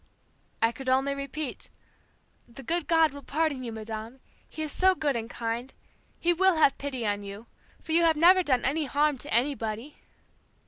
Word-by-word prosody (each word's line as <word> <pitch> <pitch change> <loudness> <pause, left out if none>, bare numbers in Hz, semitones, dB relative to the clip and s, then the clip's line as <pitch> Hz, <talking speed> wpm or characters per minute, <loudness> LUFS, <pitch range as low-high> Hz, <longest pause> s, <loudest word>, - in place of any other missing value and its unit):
"I 225 - +4
could 260 +2 -6
only 270 +2 +2
repeat, 280 0 -5 0.8
'The 245 +3 -12
good 340 +4 -1
God 325 -2 +4
will 285 - -8
pardon 290 -3 -1
you, 235 - -5
Madame. 220 +3 -7 0.3
He 315 - -5
is 305 - -3
so 375 +3 +3
good 290 -6 0
and 230 0 -4
kind. 235 +2 -4 0.5
He 345 +1 +2
will 380 +1 +3
have 310 -4 +4
pity 265 -4 -3
on 205 -1 -1
you, 200 +2 -9 0.4
for 320 - -7
you 335 +2 +4
have 325 -2 +4
never 360 +4 +6
done 260 -7 +1
any 295 +4 +1
harm 290 0 +1
to 290 - -8
anybody.' 240 0 -1
275 Hz, 180 wpm, -27 LUFS, 235-315 Hz, 0.8 s, never